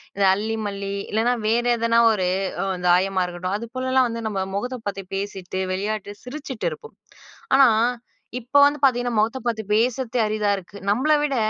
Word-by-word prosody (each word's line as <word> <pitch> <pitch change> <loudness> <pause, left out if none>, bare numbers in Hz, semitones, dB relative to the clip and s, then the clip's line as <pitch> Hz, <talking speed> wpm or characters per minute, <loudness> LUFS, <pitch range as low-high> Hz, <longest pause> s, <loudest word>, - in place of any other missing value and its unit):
இந்த 200 0 +2
அல்லி 215 +3 -2
மல்லி 200 -1 -4 0.2
இல்லனா 225 +3 +2
வேற 235 +2 +2
எதனா 230 0 +2
ஒரு 190 -4 0 0.4
அ - - -2 0.2
தாயமா 185 +2 +3
இருக்கட்டும், 180 +2 -4
அது 235 - -7
போலலாம் 260 0 +2
வந்து 230 0 -4
நம்ம 195 -3 -2
முகத்த 245 +5 -3
பாத்து 195 0 -6
பேசிட்டு, 190 -2 -4
விளையாட்டு 205 +1 -3
சிரிச்சிட்டு 265 -2 -5
இருப்போம். 450 - -11 0.6
ஆனா, 270 -1 +7 0.7
இப்போ 260 +5 +2
வந்து 290 +1 +1
பார்த்தீங்கன்னா, 245 -3 +2
முகத்த 225 +5 +1
பார்த்து 220 -2 -1
பேசுறதே 245 +2 0
அரிதாக 210 -1 +1
இருக்கு. 195 +1 -11
நம்மள 265 +9 +2
விட 285 -2 0
220 Hz, 160 wpm, -23 LUFS, 200-250 Hz, 0.7 s, ஆனா